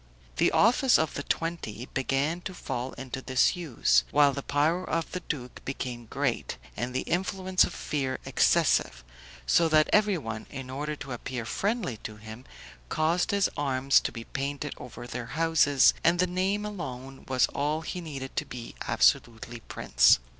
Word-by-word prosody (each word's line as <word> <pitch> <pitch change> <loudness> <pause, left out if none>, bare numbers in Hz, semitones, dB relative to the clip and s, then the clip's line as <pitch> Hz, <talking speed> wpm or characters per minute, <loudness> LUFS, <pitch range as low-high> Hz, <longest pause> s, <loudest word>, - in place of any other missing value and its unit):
The - - +3
office 245 +3 +5
of 160 -2 0
the - - -3
Twenty 140 -8 -3
began 135 +6 0
to 185 +1 -6
fall 125 -5 -4
into 130 0 -6
disuse, 130 +2 +2
while 145 -1 +4
the 140 - -4
power 155 +6 +1
of 165 -2 -2
the 180 - -3
duke 130 -7 -6
became 125 -3 -5
great, - - -2 0.2
and 125 - -3
the - - +1
influence 185 +1 +1
of - - -6
fear 135 -3 -2
excessive; - - +2 0.4
so 165 - +4
that 155 -1 +4
everyone, 170 - +1
in 135 -2 -7
order 150 +3 -3
to 140 - -9
appear 120 0 -5
friendly 200 - -1
to 110 0 -8
him, 110 +4 -11 0.4
caused 165 +3 +1
his 200 -1 +3
arms 135 -1 +3
to - - -3
be 115 - -7
painted 140 +3 -4
over 120 0 -9
their 120 -1 -6
houses, 160 -4 +5
and 170 +1 +4
the 180 - +3
name 190 +3 -1
alone 135 -10 -7
was 130 -2 +3
all 150 +2 -1
he 175 +3 -5
needed 135 -5 -7
to - - 0
be 120 -2 -8
absolutely 120 0 +1
prince. 65 - +4
140 Hz, 160 wpm, -28 LUFS, 125-170 Hz, 0.4 s, office